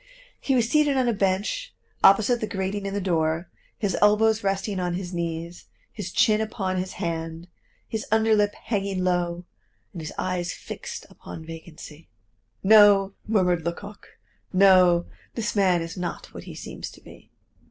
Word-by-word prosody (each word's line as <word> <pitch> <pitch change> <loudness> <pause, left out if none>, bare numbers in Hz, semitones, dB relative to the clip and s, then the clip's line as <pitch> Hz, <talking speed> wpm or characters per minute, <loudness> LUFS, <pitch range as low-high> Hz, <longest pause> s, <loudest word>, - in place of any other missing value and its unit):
He 270 - 0
was 235 -3 +2
seated 290 +1 +3
on 255 -2 +2
a 235 - +2
bench 205 - -1 0.3
opposite 220 +5 +5
the 215 - -1
grating 195 +1 -3
in 195 - -4
the - - 0
door, 165 -2 -1 0.3
his 205 -3 -1
elbows 215 +1 +4
resting 195 0 -1
on 175 -1 -1
his 180 0 -5
knees, 170 0 -4 0.3
his 195 -4 -6
chin 215 0 +3
upon 195 -4 -2
his 185 0 -3
hand, 165 0 -4 0.4
his 220 -1 -4
under 220 0 +3
lip 205 -1 +1
hanging 195 -4 -2
low 175 -1 -1 0.5
and 170 - -6
his 155 - -6
eyes 180 -1 -2
fixed - - -8
upon 160 - -10
vacancy. 160 -1 -11 0.6
"No," 200 -1 +6
murmured 180 -6 +2
Lecoq, 200 +5 -7 0.3
"no, 185 -2 +5 0.3
this 220 -2 -2
man 185 -4 +3
is 165 - -7
not 180 -2 -5
what - - -9
he - - -9
seems - - -7
to - - -16
be." - - -16
190 Hz, 160 wpm, -25 LUFS, 175-210 Hz, 0.6 s, No